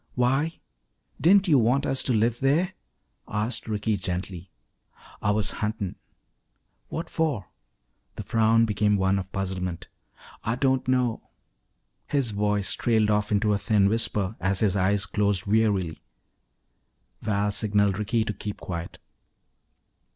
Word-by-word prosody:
"Why? 135 +6 +1 0.6
Didn't 195 +3 +5
you 145 -6 +5
want 125 +5 +2
us 135 - +2
to - - +1
live 115 +1 +1
there?" 160 +8 +2 0.5
asked 110 +4 -2
Ricky 105 0 -1
gently. 90 -1 -5 0.7
"Ah 105 - +2
was 105 0 +2
huntin' 105 -3 -3 0.5
" - - -47
"What 165 - -4
for?" 150 - -2 0.6
The - - -6
frown 115 0 +3
became 105 -1 +1
one 95 0 +2
of 95 0 -7
puzzlement. 90 -3 -4 0.5
"Ah 115 - 0
don't 130 0 +1
know 125 -3 0 0.4
" - - -49
His 130 -5 +1
voice 105 -1 0
trailed 110 -3 +2
off 105 0 0
into 105 0 +2
a 100 - 0
thin 100 -3 +3
whisper 105 -2 0
as 95 +1 0
his 105 -3 +2
eyes 100 +2 +2
closed 100 -4 0
wearily. 100 -6 +1 1.2
Val 105 -1 0
signaled 100 -1 +1
Ricky 110 +2 0
to 105 - -2
keep 105 +1 -6
quiet. 85 -2 -6
105 Hz, 135 wpm, -26 LUFS, 100-115 Hz, 1.2 s, Didn't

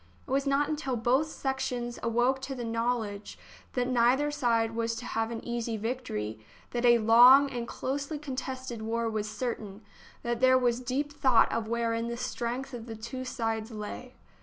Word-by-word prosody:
It - - -8
was 275 +1 +1
not 280 +1 +2
until 300 -4 -2
both 250 +6 +2
sections 260 -4 -3
awoke 240 +3 +1
to 265 0 -5
the 245 - -5
knowledge 230 -3 -2 0.4
that 250 -1 0
neither 255 +4 +3
side 230 -5 +1
was 230 0 -1
to 245 - -7
have 225 -1 -1
an 230 -1 -6
easy 235 -1 -2
victory, 205 - -3 0.3
but 240 - -1
that 245 - +4
a 240 - +7
long 245 +5 +7
and 240 -2 -4
closely 285 +5 -3
contested 260 -4 -5
war 230 +1 -1
was 215 -1 -2
certain, 215 -2 -4 0.4
that 240 -1 -1
there 260 0 +6
was 245 -1 +1
deep 265 +4 -2
thought 255 -5 +4
of 225 -1 -2
wherein 230 0 -1
the 235 0 -4
strength 250 +1 -3
of 240 -1 -7
the 225 - -6
two 235 +4 -6
sides 225 -3 -2
lay. 225 +3 -7
240 Hz, 180 wpm, -29 LUFS, 230-260 Hz, 0.4 s, a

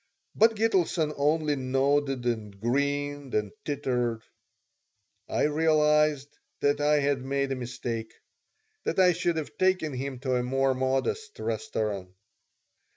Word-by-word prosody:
But 225 +1 +4
Gitelson 180 -8 +1
only 150 +1 +1
nodded 135 0 0
and 105 -4 -3
grinned 140 +3 -1
and 105 0 0
tittered. 125 -6 -1 1.1
I - - 0
realized 150 -2 +2 0.2
that 145 +1 +2
I 150 0 +3
had 140 -2 +1
made 140 0 -1
a - - 0
mistake 120 -2 -5 0.7
that - - -2
I 180 -1 +6
should 170 -1 0
have 155 - -5
taken 185 -5 +2
him 130 +1 -4
to 130 -2 0
a - - +1
more 135 +2 +1
modest 135 - -1
restaurant. 105 -4 -3
140 Hz, 125 wpm, -27 LUFS, 125-150 Hz, 1.1 s, I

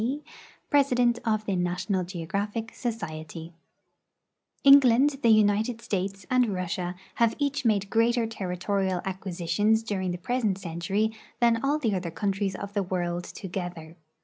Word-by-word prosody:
D., 270 +6 -2 0.5
President 245 -4 +3
of 215 -1 0
the 195 - 0
National 180 +2 -1
Geographic 200 +6 -4
Society 165 - -5 1.1
England, 275 0 +6
the 230 - +4
United 215 +2 +3
States, 195 -2 -3
and 250 -4 +2
Russia 180 0 -3 0.2
have 230 -1 +3
each 285 -1 -1
made 200 -3 +1
greater 230 +1 +3
territorial 190 -2 -2
acquisitions 190 +3 0
during 195 -4 -2
the 175 - -2
present 215 0 0
century 195 +4 -1 0.3
than 235 -1 +3
all 285 +2 +2
the 235 -9 0
other 180 -2 -2
countries 195 +2 -1
of 200 0 -7
the 205 - +1
world 175 -2 -2
together. 175 -4 -6
200 Hz, 135 wpm, -27 LUFS, 180-230 Hz, 1.1 s, England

